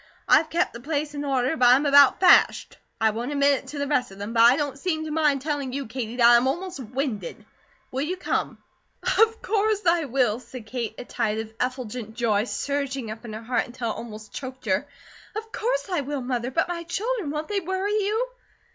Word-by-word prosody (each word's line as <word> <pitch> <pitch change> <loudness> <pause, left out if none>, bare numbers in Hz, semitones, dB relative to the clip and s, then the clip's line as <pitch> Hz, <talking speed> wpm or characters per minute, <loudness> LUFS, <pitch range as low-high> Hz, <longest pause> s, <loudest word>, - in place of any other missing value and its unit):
I've 320 - +5
kep' 335 - 0
the 235 - -8
place 295 +2 -2
in 290 0 -4
order, 270 +1 +1
but 250 -5 +4
I'm 260 +4 +5
about 285 -1 +6
fashed. 370 - +4 0.2
I 220 -1 +3
won't 235 +5 -4
admit 280 -1 +3
it - - -16
to 295 - -7
the 285 - -1
rest 275 -3 +1
of 195 - -13
them; 205 +3 -5
but 230 - +4
I 240 +2 +8
don't 285 -2 -3
seem 315 -3 -1
to 310 - -5
mind 300 -4 +2
telling 285 -4 -2
you, 275 0 -3
Katie, 230 0 -5
that 240 -2 +4
I 240 0 +8
am 245 +2 +2
almost 350 +3 -3
winded. 245 - -4 0.5
Will 260 - -2
you 350 +6 -2
come?" - - -2 0.6
"Of 450 0 +3
course 425 -1 +1
I 335 -2 +3
will," 245 -4 +1
said 255 -2 -10
Kate, 230 -1 -4
a - - -7
tide 220 -4 -1
of 220 0 -5
effulgent 245 -3 -4
joy 220 -3 +1
surging 275 -3 -3
up 225 +2 -9
in 220 - -7
her 220 +1 -7
heart 245 +2 0
until 240 -2 -4
it - - -6
almost 215 -2 -9
choked 260 -1 -7
her. 195 +7 0 0.5
"Of 445 +1 -6
course - - -1
I 355 - +1
will, 285 0 -4
Mother, 245 -1 -2
but 325 +7 0
my 350 -1 -4
children, 405 +2 -2
won't 300 +1 -3
they 410 -1 0
worry 380 +2 -2
you?" 430 +4 0
275 Hz, 220 wpm, -25 LUFS, 240-320 Hz, 0.6 s, I